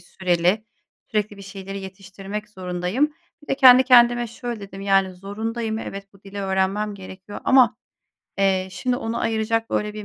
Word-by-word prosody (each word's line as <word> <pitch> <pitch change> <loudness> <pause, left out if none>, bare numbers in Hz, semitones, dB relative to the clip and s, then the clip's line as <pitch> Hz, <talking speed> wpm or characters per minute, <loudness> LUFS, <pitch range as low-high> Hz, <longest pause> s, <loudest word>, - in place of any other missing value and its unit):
süreli, 180 +3 0 0.5
sürekli 210 -1 -1
bir 200 - -11
şeyleri 195 0 -7
yetiştirmek 195 +2 -8
zorundayım. 185 +9 -1 0.3
Bir - - -19
de - - +1
kendi 255 -1 +8
kendime 240 -1 +5
şöyle 235 0 -6
dedim, 195 -1 -9
yani, 195 -1 +2
zorundayım, 220 +4 -4
evet, 195 -2 -8
bu 195 - -22
dili 200 0 -9
öğrenmem 195 +2 0
gerekiyor 190 +1 -10
ama, 250 -2 +5 0.6
eee, 190 -1 +2
şimdi 250 +6 -1
ona 230 -2 -3
ayıracak 225 0 -1
böyle 210 0 -1
bir 210 - -7
205 Hz, 155 wpm, -23 LUFS, 195-225 Hz, 0.6 s, kendi